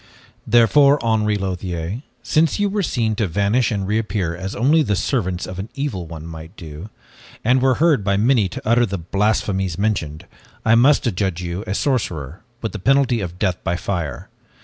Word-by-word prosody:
"Therefore, 140 +5 +5
Henri 105 -2 +2
Lothiere, 95 +1 -4 0.2
since 155 - +2
you 205 0 +2
were 205 +1 -1
seen 115 - 0
to 110 -3 +1
vanish 100 +7 +1
and 100 -4 -2
to - - -3
reappear 100 -4 -1
as 95 +3 -5
only 150 +6 +3
the 105 -9 +1
servants 95 -5 -1
of 90 - -7
the 95 +2 -4
evil 125 - -3
one 80 -1 -8
might 80 +3 -10
do, 80 +4 -9 0.5
and 125 +3 +3
were 130 -1 +3
heard 150 -8 +3
by 100 0 +1
many 110 -2 +3
to - - -8
utter 120 +1 +4
the 100 0 -3
blasphemies 95 0 0
mentioned, 85 -8 -2 0.4
I 110 - +5
must 135 +6 +5
adjudge 95 -5 -1
you 90 +3 -4
a 95 - -2
sorcerer 90 - -2 0.2
with 110 - -2
the 105 - -6
penalty 130 0 +2
of 90 -2 -5
death 90 -3 -1
by 85 - 0
fire. 90 -4 -4
105 Hz, 185 wpm, -20 LUFS, 90-120 Hz, 0.5 s, Therefore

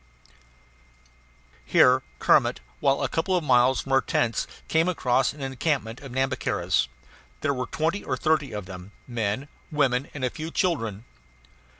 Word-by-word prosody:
Here - - +5 0.2
Kermit, - - +3 0.2
while 135 0 +2
a - - +2
couple 185 +3 0
of 175 - -2
miles 125 -1 +4
from 135 - -8
our 135 0 +5
tents, 115 -2 0 0.2
came 160 +2 +2
across 135 -7 +1
an 145 - -12
encampment 135 -3 -2
of 135 -3 -9
Nhambiquaras. 130 0 0 0.5
There - - +1
were 125 -1 -3
twenty 165 +6 -1
or - - -2
thirty 155 -4 +1
of 105 -3 -5
them 90 +1 -10
men, 115 +2 -2 0.2
women, 135 -3 +1
and 135 -3 -2
a 125 - -1
few 160 +1 -6
children. 115 - -1
135 Hz, 150 wpm, -26 LUFS, 120-155 Hz, 0.5 s, Here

